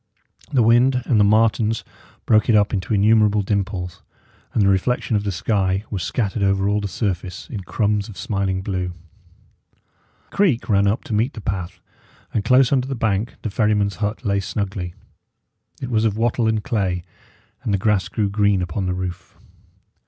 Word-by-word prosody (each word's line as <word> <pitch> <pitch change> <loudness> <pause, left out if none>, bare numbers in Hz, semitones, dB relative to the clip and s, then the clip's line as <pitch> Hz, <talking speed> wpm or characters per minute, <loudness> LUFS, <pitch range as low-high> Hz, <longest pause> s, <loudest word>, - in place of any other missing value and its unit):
The 130 -5 +3
wind 125 +3 +4
and 115 - +2
the - - +6
martens 110 +1 +2 0.4
broke 110 0 +3
it 115 - +5
up 105 +1 +3
into 100 +2 -1
innumerable 105 0 +4
dimples; 95 -3 -3 0.5
and 110 - +2
the - - +3
reflection 105 +5 +1
of 105 - 0
the 100 - 0
sky 95 +1 0
was 100 -4 -2
scattered 105 +3 -2
over 95 0 +2
all 105 +1 +1
the 100 - -2
surface 95 -1 -3
in 110 - -4
crumbs 105 +2 -1
of 105 - -10
smiling 95 -2 -2
blue. 90 -2 -3 1.4
A - - -14
creek 170 - +2
ran 100 -2 +3
up 100 +3 0
to - - -5
meet 115 +6 +1
the - - -8
path, 95 -4 -4 0.5
and 105 - 0
close 130 +2 +4
under 130 -2 +2
the 135 - -3
bank 110 -1 -1
the 110 - -3
ferryman's 105 -2 +1
hut 105 +3 -3
lay 100 -1 +1
snugly. 95 -3 -4 0.9
It 125 - -4
was 110 -1 +2
of 110 -2 +1
wattle 115 0 +1
and 110 -1 0
clay, 95 -6 -1 0.6
and - - -2
the 100 - +2
grass 105 -1 +1
grew 105 -3 -1
green 100 -2 +2
upon 90 +2 -3
the 90 - -1
roof. 90 -1 -6
105 Hz, 180 wpm, -21 LUFS, 95-110 Hz, 1.4 s, the